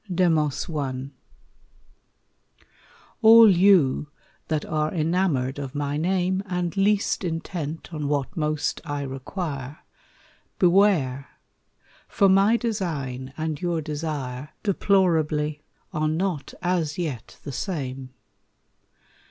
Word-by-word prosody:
Demos 165 -5 +1
I 135 -4 -4 2.1
All 225 -1 +9
you 175 -7 +4 0.4
that 155 -2 -1
are 155 -1 -1
enamored 155 -6 0
of 135 -1 -6
my 145 0 -2
name 185 +3 0
And 180 -1 -2
least 200 +1 +1
intent 165 -1 -4
on 150 -2 -3
what 145 +3 -1
most 155 -2 -1
I 145 -3 -3
require, 140 +1 -5 0.8
Beware; 175 -8 +3 0.8
for 200 - +3
my 195 +4 +5
design 150 - -3
and 155 -2 -3
your 175 -2 0
desire, 150 -3 -4
Deplorably, 160 -7 +1 0.3
are 155 0 0
not 165 -1 -2
as 175 -4 0
yet 145 - -5
the 145 - -6
same. 135 -5 -4
155 Hz, 100 wpm, -24 LUFS, 145-185 Hz, 2.1 s, All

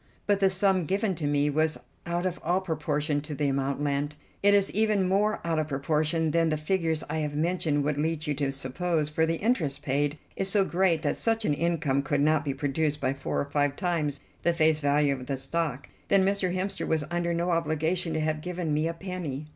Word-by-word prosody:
"But 205 -1 +2
the 195 -1 +4
sum 190 -2 +2
given 195 +2 +1
to 155 -4 -3
me 145 0 +2
was 155 +1 +1 0.3
out 175 +1 -1
of 180 -1 -2
all 175 +3 +2
proportion 150 -4 -1
to 150 0 -6
the 145 0 0
amount 140 +1 -1
lent. 145 +1 -1 0.3
It 205 0 +5
is 200 -1 +3
even 210 -3 +2
more 205 +3 +2
out 165 -2 +1
of 155 - -1
proportion 155 +3 0
than 165 0 +2
the 155 - 0
figures 160 0 0
I 160 - -2
have 150 -1 -2
mentioned 155 -2 0
would 145 0 -1
lead 160 0 -1
you 150 - 0
to 140 -1 -1
suppose, 150 +4 -1
for 160 +1 +1
the 165 - +1
interest 160 - -1
paid 145 +2 0 0.2
is 195 - -1
so 195 -1 +3
great 175 -3 +1
that 145 - 0
such 225 -1 0
an 150 - +2
income 155 -3 0
could 140 +1 0
not 155 0 +3
be 140 -2 -2
produced 150 +1 -1
by 130 - 0
four 140 - -3
or - - -2
five 145 0 0
times 155 -6 -1 0.2
the 170 - +2
face 160 -2 +3
value 145 -1 +2
of 125 -2 -7
the 135 -1 -1
stock. 140 -1 -2 0.2
Then 195 -1 +4
Mr. 195 -2 +1
Hemster 190 +2 -2
was 160 -2 +1
under 175 0 0
no 170 +1 0
obligation 165 +1 0
to 160 - 0
have 155 0 -1
given 175 -2 -3
me 155 +2 +1
a 165 - -3
penny." 165 -6 -5
160 Hz, 220 wpm, -27 LUFS, 145-180 Hz, 0.3 s, It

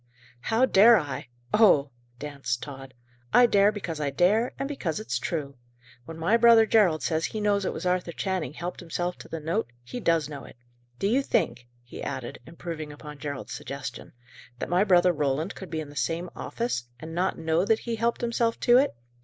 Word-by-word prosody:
"How 225 - +2
dare 230 0 +7
I! 145 - -4 0.3
Oh!" 150 -11 +5 0.3
danced 140 -4 -4
Tod. 135 -2 -9 0.4
"I 245 - +8
dare 205 -2 +4
because 180 -7 -5
I 145 - 0
dare, 190 - +2
and 275 - -2
because 210 - -3
it's 215 - -2
true. 140 -6 -4 0.5
When 165 +3 -8
my 170 +8 +3
brother 230 -1 +7
Gerald 195 -8 +3
says 160 -1 0
he 215 - -4
knows 205 -1 +1
it - - 0
was - - -6
Arthur 180 -1 0
Channing 175 -5 -3
helped 175 +3 -5
himself 175 +1 -3
to - - -11
the 165 - -4
note, 155 -5 -2
he 185 - -6
does 165 - +2
know 145 -2 -8
it. - - -13 0.4
Do 195 - 0
you 250 +6 +3
think," 120 - -1 0.2
he 120 - -10
added, 120 -2 -5
improving 165 -2 -6
upon 150 0 -10
Gerald's 140 -3 -5
suggestion, 140 -3 -7 0.4
"that - - -4
my 180 +3 +3
brother 180 -3 +4
Roland 150 +4 -1
could 190 - -9
be 160 -1 -3
in 150 - -8
the 145 - -13
same 170 +4 -2
office, 230 - -3
and 160 +1 -8
not 180 +3 0
know 160 +1 +1
that 220 +2 +2
he 235 -1 -3
helped 235 +1 0
himself 235 -1 0
to 240 0 +6
it? 280 - +1
170 Hz, 195 wpm, -27 LUFS, 150-210 Hz, 0.5 s, I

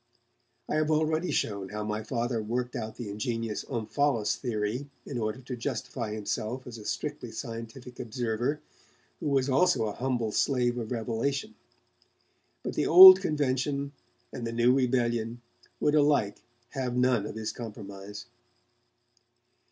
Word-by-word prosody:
I - - 0
have 155 0 +1
already 155 +2 +1
shown 100 -3 -1
how 105 +1 -4
my 105 0 -2
Father 115 +1 -2
worked 120 +4 -3
out 110 -2 -4
the 120 - -6
ingenious 115 +1 -3
'Omphalos' 115 -2 0
theory 120 +3 -3 0.2
in 130 -4 -4
order 110 +3 -3
to 130 0 -6
justify 120 -2 -4
himself 110 +4 -3
as 120 -2 -8
a 105 - -11
strictly - - -4
scientific 115 +2 -8
observer 120 +5 -2 0.6
who - - -3
was 135 -2 +2
also 140 -1 +3
a 105 - -2
humble 120 -3 -1
slave 125 0 +1
of 115 0 -5
revelation. 125 - -2 1.1
But - - -3
the - - 0
old 375 0 +11
convention 140 -1 -1 0.4
and 120 -3 -4
the - - -3
new 120 +2 +3
rebellion 120 -3 0 0.4
would 150 - +2
alike 145 -9 +2 0.3
have 125 -3 -3
none 125 -4 +2
of - - -7
his 110 -1 -3
compromise. 105 -3 -8
120 Hz, 140 wpm, -28 LUFS, 110-135 Hz, 1.1 s, old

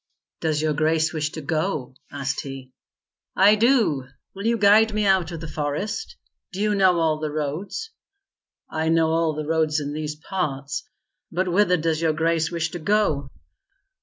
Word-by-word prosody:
"Does 155 -1 0
your 155 -1 +1
grace 160 +1 +1
wish 155 -1 -1
to 160 - -5
go?" 155 -3 -2 0.2
asked 135 -1 -3
he. 135 -2 -9 0.6
"I 200 +2 +6
do. 215 - +2 0.3
Will 200 +3 -4
you 230 0 +2
guide 215 +1 +5
me 210 -1 +1
out 190 -4 +2
of 165 -2 -6
the 165 - -6
forest? 155 - -3 0.4
Do 190 - -7
you 210 0 +2
know 190 -3 +4
all 160 -2 +1
the 155 0 -2
roads?" 155 - -4 0.8
"I 160 0 -1
know 165 -1 +3
all 165 -1 +1
the 155 0 -4
roads 160 -1 +1
in 145 0 -4
these 150 0 -4
parts. 150 -4 -4 0.4
But 185 +2 0
whither 180 -1 +3
does 160 0 -1
your 160 -1 +2
grace 165 0 +1
wish 165 -2 -2
to 175 - -5
go?" 155 -7 +1
160 Hz, 170 wpm, -23 LUFS, 150-190 Hz, 0.8 s, I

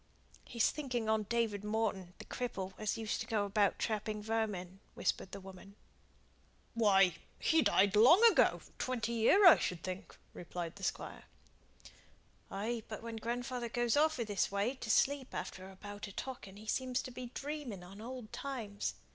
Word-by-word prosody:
"He's 235 -2 +1
thinking 250 -6 -3
on 220 -2 +1
David 225 -4 0
Morton, 210 -4 -2
the - - -10
cripple, 195 -7 -4
as 215 +1 -1
used 220 -1 -2
to 225 - -5
go 215 -4 +1
about 200 0 +2
trapping 215 -1 -2
vermin," 205 -5 -2 0.2
whispered 190 - -1
the 200 - -6
woman. 195 +1 -12 1.0
"Why, 195 -6 +4 0.2
he 320 0 +3
died 200 -6 +4
long 270 - +7
ago - - +3 0.2
twenty 245 -2 -1
year, 235 - +5
I 355 - +10
should 175 -3 -2
think," 185 0 -6 0.2
replied 175 0 -6
the 200 - -11
Squire. - - -3 1.2
"Ay, 225 +4 -2
but 215 0 -7
when 230 -1 -5
grandfather 240 +1 -3
goes 240 -1 +1
off 310 -1 +3
i' - - +1
this 205 -3 0
way 200 +5 0
to 255 -4 -8
sleep 270 +3 +2
after 190 0 -5
a 190 - -13
bout 205 +2 -8
of 200 - -11
talking 225 -7 -6
he 215 - -11
seems 255 +3 -1
to 255 - -7
be 250 0 -6
dreaming 280 -10 -5
on 195 +4 -11
old 245 -1 -8
times. 240 -5 -4
220 Hz, 170 wpm, -34 LUFS, 200-245 Hz, 1.2 s, I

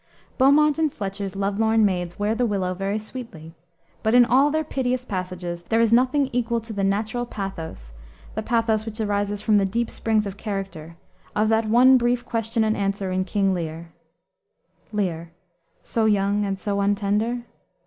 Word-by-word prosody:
Beaumont 290 +3 +5
and 310 -2 +2
Fletcher's 195 -2 -5
love 200 +1 -1
lorn 220 -1 +4
maids 180 -3 -1
wear 205 +1 0
the 240 +1 +1
willow 190 -3 -1
very 195 +3 -2
sweetly, 215 -8 -8 0.5
but 220 +2 +2
in 245 -1 +8
all 260 +5 +4
their 315 +1 0
piteous 255 -3 -2
passages 180 -4 -4
there 225 +6 0
is 230 -1 +3
nothing 260 +3 +3
equal 235 -1 0
to 225 0 -8
the 200 -1 -2
natural 215 +5 0
pathos 170 - -7 0.4
the 220 - -3
pathos 225 -1 +1
which 220 0 -6
arises 205 -1 -1
from 215 -2 +4
the - - +2
deep 230 +4 -1
springs 220 -2 0
of 200 -1 -6
character 195 -7 -6 0.4
of 215 +1 +2
that 220 -1 +2
one 255 +3 +6
brief 240 0 0
question 225 0 -1
and 215 0 +1
answer 195 -1 -2
in 185 0 0
King 195 0 +1
Lear. 165 -1 -5 1.0
"Lear. 175 -6 -2 0.5
So 225 -1 0
young 205 -1 +2
and 195 -1 -3
so 200 0 -2
untender? 205 +4 0
210 Hz, 170 wpm, -23 LUFS, 195-230 Hz, 1.0 s, in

